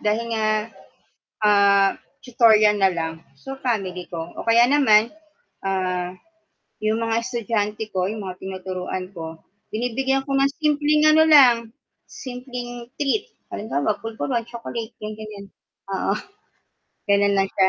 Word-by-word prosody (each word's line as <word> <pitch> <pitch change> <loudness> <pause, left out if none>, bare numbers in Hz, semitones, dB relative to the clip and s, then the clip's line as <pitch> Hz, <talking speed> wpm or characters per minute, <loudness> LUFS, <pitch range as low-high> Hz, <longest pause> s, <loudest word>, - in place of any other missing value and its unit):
dahil 215 +2 0
nga, 220 -1 0 1.0
ah, 200 -1 +5 0.3
tutorial 215 -4 +4
na 195 -1 +5
lang, 160 0 -2 0.2
so, 270 - -9
family 195 -8 -2
ko, 165 -2 -5 0.2
o - - -6
kaya 230 +1 +6
naman, 235 -6 +5 0.6
ah, 185 -1 -1 0.7
'yong 215 +1 +1
mga 225 0 0
estudyante 225 -3 -2
ko, 185 -1 0
'yong 215 +3 -4
mga 185 -1 -6
tinuturuan 185 -1 -5
ko, 160 -1 -8 0.3
binibigyan 265 +4 0
ko - - -4
ng 275 +1 +3
simpleng 300 0 +2
ano 315 +1 +6
lang, 280 -6 +8 0.5
simpleng 245 -2 -7
treat, 295 +9 0 0.2
halimbawa, 205 -1 -2
pulvoron, 225 +2 -3
chocolate, 235 -1 -6
gan 215 0 -5
ganiyan. 215 -2 -9 0.5
Oo, 195 +1 0 1.0
gano'n 200 0 +4
lang 195 - +2
siya. 190 -1 +3
215 Hz, 130 wpm, -22 LUFS, 195-245 Hz, 1.0 s, lang